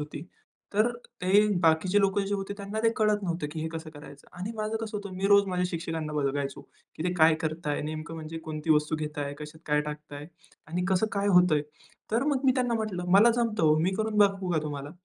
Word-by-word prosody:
होती. 150 0 -6 0.5
तर 215 +4 +3 0.3
ते 200 +3 +5 0.2
बाकीचे 165 +5 +3
लोकं 195 0 +2
जे 205 - -1
होते 195 0 -4
त्यांना 200 +1 -5
ते 230 - +5
कळत 210 -1 +2
नव्हतं 170 -4 -2
की 155 - -5
हे 160 - -2
कसं 160 -1 -6
करायचं 145 -2 -13
आणि 195 +5 -4
माझं 215 0 -2
कसं 220 -1 -4
होतं 200 -2 -6
मी 190 +2 0
रोज 200 -1 +6
माझ्या 180 0 0
शिक्षकांना 165 -3 -4
बघायचो 140 -1 -2 0.4
की - - -4
ते 180 - +1
काय 160 -2 +5
करत 160 +1 -3
आहे 145 - -1
नेमकं 155 +2 -5
म्हणजे 160 0 -6
कोणती 155 0 -3
वस्तू 150 +1 +3
घेत 150 -1 -5
आहे 140 0 -3
कशात 150 +1 -9
काय 150 0 +2
टाकत 150 0 -7
आहे 145 +1 -8 0.4
आणि 175 +3 -2
कसं 190 +3 +2
काय 200 0 0
होतं 180 -3 +5
आहे. 150 - +1 0.5
तर 235 +3 +2
मग 275 -2 0
मी 260 - +5
त्यांना 245 -3 +1
म्हटलं 215 -5 -2
मला 230 +4 +7
जमतं 225 -4 0
हो 155 0 +5
मी 170 +4 +2
करून 220 0 -1
बघवू 195 -2 +3
का 160 - +2
तुम्हाला 145 -1 -5
180 Hz, 225 wpm, -28 LUFS, 155-205 Hz, 0.5 s, मला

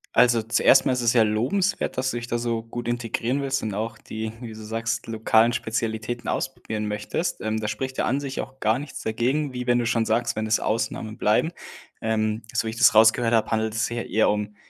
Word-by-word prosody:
Also, 120 -1 +5
zuerst 115 +1 +4
mal 130 - +3
ist 125 - -1
es 115 -1 +3
sehr 120 -3 +5
lobenswert, 125 - 0
dass 130 0 0
du 120 - -3
dich 120 - -4
da 120 0 -2
so 115 -1 -2
gut 120 +1 -6
integrieren 120 +2 -1
willst 135 -1 -1
und 105 -3 -3
auch 115 +2 -3
die- 110 0 -5
wie 115 -3 -7
du - - -11
sagst- 115 +2 -3
lokalen 110 +1 +3
Spezialitäten 110 +1 -3
ausprobieren 110 -5 -3
möchtest. 105 +12 -3
Ähm, 110 0 -1
da 110 - -3
spricht 130 +5 -4
ja - - +2
an 135 - +1
sich 140 -2 -4
auch 135 0 -10
gar 110 +3 +2
nichts 145 0 -8
dagegen, 130 +6 0
wie 125 0 -5
wenn 120 0 +4
du 120 - 0
schon 115 -1 +1
sagst, 115 +2 +1
wenn 110 0 -2
es 110 - +2
Ausnahmen 110 0 -2
bleiben. 110 +10 +2 0.5
Ähm, 110 0 0
so - - 0
wie 110 - -2
ich 115 - -9
das 120 - +5
rausgehört 115 +2 +5
habe, 110 - +1
handelt 110 -1 0
es 115 -1 +1
sich 120 - -4
ja 120 - -2
eher 110 - +2
um, 105 0 -3
115 Hz, 235 wpm, -24 LUFS, 110-120 Hz, 0.5 s, Also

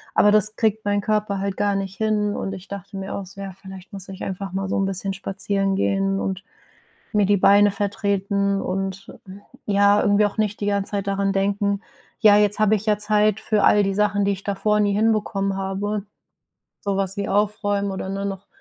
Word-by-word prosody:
aber 205 - +5
das 215 0 +5
kriegt 220 -1 0
mein 205 0 +1
Körper 210 -1 -1
halt 195 0 -3
gar 205 -1 +1
nicht 195 -1 -4
hin 210 -1 0
und 195 - -4
ich 185 0 -9
dachte 200 0 -8
mir 195 0 -5
auch 200 - -5
so, 200 +2 -11
ja, 195 -1 -6
vielleicht 190 0 -11
muss 195 -1 -8
ich 190 0 -8
einfach 195 0 -5
mal 195 0 -2
so - - 0
'n 195 - +1
bisschen 195 0 -2
spazieren 195 0 -1
gehen 195 0 0
und 195 0 -3 0.7
mir 210 -2 +3
die 205 +1 +3
Beine 200 +2 +5
vertreten 200 -1 -1
und, 195 +1 -4 0.2
äh, - - -8 0.3
ja, 205 0 +4
irgendwie 205 0 +3
auch 205 - -6
nicht 210 -1 -1
die 205 - -2
ganze 200 0 -1
Zeit 200 -1 -2
daran 195 0 0
denken: 200 +1 0 0.4
„Ja, 210 -3 +7
jetzt 210 0 +2
habe 215 0 +4
ich 210 +2 -7
ja 210 -1 +2
Zeit 210 0 +2
für 215 -2 0
all 205 - +5
die 195 0 -1
Sachen, 205 0 +1
die 200 - +2
ich 195 0 -6
davor 210 +1 +1
nie 205 -1 +2
hinbekommen 205 -2 0
habe.“ 195 +2 -3 0.8
Sowas 195 -1 -1
wie 200 - -3
aufräumen 205 0 0
oder 190 0 -5
nur 195 0 -3
noch, 195 0 -6
200 Hz, 205 wpm, -22 LUFS, 195-205 Hz, 0.8 s, Ja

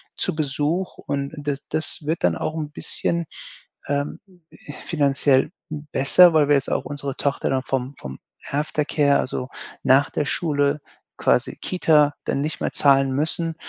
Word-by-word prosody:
zu 185 - -1
Besuch 155 +4 -1
und 140 0 -3
d 155 - -8
das 140 - -11
das 155 - -2
wird 160 +2 -1
dann 85 -2 +3
auch 155 - -3
'n 155 -2 -4
bisschen, 170 +2 -2 0.6
ähm, 145 0 -2 0.7
finanziell 140 -3 +2 0.4
besser, 170 +6 +6
weil 155 -2 +4
wir 145 - +6
jetzt 135 - -1
auch - - -1
unsere 140 -2 -4
Tochter 140 -1 -1
dann 135 -1 +1
vom 130 +1 -2
vom 65 0 -7 0.3
Aftercare, 145 0 +1
also 130 0 -3 0.3
nach 135 +2 +4
der 150 - -1
Schule 145 -2 0 0.4
quasi - - +1
Kita 150 -5 +3
dann 140 - -1
nicht 155 +2 -3
mehr - - -1
zahlen 135 -1 +3
müssen. 160 +3 0
145 Hz, 155 wpm, -23 LUFS, 140-155 Hz, 0.7 s, besser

